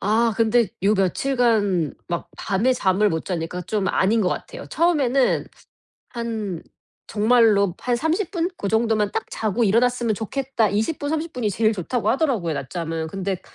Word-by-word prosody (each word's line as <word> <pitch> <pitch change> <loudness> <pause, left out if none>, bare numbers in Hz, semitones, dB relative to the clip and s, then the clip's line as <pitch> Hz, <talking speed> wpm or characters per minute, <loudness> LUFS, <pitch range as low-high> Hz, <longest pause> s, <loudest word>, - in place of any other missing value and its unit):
아 225 +3 +2
근데 230 -1 +3
요 205 +2 +4
며칠 205 +8 0
간 205 - +2
막 170 -1 -3
밤에 215 +5 +1
잠을 205 -3 +2
못 160 -4 -2
자니까 180 -1 -3
좀 205 +2 -2
아닌 220 +4 +2
것 185 - +2
같아요. - - -6
처음에는 280 -6 +2 0.6
한 220 -7 -4 0.4
정말로 210 -4 +3
'한 245 -1 0
30 320 - -1
분? 345 -3 -1
고 200 - -3
정도만 220 -1 +1
딱 - - -2
자고 220 +2 0
일어났으면 235 +2 +2
좋겠다.' 235 +1 -1
20 220 +10 -1
분 290 - -3
30 320 +2 -2
분이 245 -4 -1
제일 215 +3 +2
좋다고 210 +3 -2
하더라고요, 240 - 0
낮잠은. 160 +3 -4
근데 190 +1 -3
220 Hz, 290 characters per minute, -22 LUFS, 195-245 Hz, 0.6 s, 요